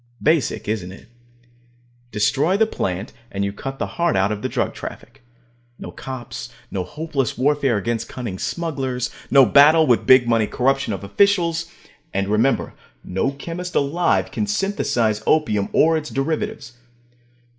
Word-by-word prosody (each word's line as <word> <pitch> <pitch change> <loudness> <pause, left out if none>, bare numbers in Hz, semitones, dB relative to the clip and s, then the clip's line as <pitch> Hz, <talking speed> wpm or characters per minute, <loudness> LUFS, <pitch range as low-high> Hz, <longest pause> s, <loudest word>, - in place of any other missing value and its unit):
Basic, 155 -8 +1
isn't 100 -4 -3
it? 100 - -14 1.0
Destroy 140 - +1
the 220 - +4
plant, 95 - -3 0.2
and 100 0 -1
you 100 - -3
cut 135 +6 -6
the - - -2
heart 170 -1 0
out 95 +2 +2
of 105 -1 -3
the - - -2
drug - - -1
traffic. 135 - -9 0.6
No - - -8
cops; 120 - -7 0.2
no 95 - -2
hopeless 140 - -3
warfare 140 -2 +2
against 115 +3 -2
cunning 115 -8 -6
smugglers; 135 -7 -3 0.2
no 135 -1 +7
battle 150 +7 +6
with 120 -4 +2
big 130 -2 +7
money 115 -2 +2
corruption 135 -1 0
of 100 - -4
officials. 170 - +2 0.5
And 100 0 0
remember: 110 +6 +1 0.3
no 95 +8 -1
chemist 170 +5 -6
alive 165 +5 +1
can 210 - -2
synthesize 195 - 0
opium 110 -11 +2
or 165 +1 +4
its 155 -1 -5
derivatives. 160 - -3
135 Hz, 145 wpm, -21 LUFS, 105-160 Hz, 1.0 s, no